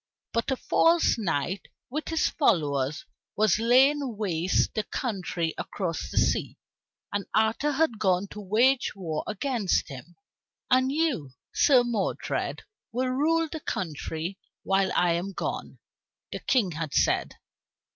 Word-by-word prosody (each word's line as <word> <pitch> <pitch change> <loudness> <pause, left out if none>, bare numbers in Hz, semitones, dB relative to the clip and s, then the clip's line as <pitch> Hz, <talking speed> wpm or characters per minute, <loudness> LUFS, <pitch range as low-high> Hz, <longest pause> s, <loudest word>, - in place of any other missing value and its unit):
But 230 +3 0
a 265 - +2
false 330 -4 +3
knight 180 -1 -2 0.2
with 305 +3 -3
his 325 -1 +2
followers 150 - +1 0.3
was 215 -1 +3
laying 260 +1 +3
waste 180 -4 0
the 215 - 0
country 180 - -3
across 175 -5 -3
the - - -7
sea, - - +1 0.6
and 205 -1 -2
Arthur 220 +7 +2
had 275 -7 +1
gone 185 -1 +2
to 210 - -8
wage 235 +7 +2
war 165 -6 -3
against 215 - 0
him. 140 +5 -10 0.6
"And 260 +1 +4
you, 280 - -1 0.2
Sir 255 -4 +5
Modred, 230 -5 -2 0.3
will 255 +2 -1
rule 320 +5 +2
the 315 - -6
country 165 - -4 0.2
while 195 0 +2
I 175 -1 +3
am 175 +4 -2
gone," - - -4 0.5
the - - -4
King 220 -9 +1
had 155 -2 -4
said. - - +2
210 Hz, 135 wpm, -27 LUFS, 175-260 Hz, 0.6 s, Sir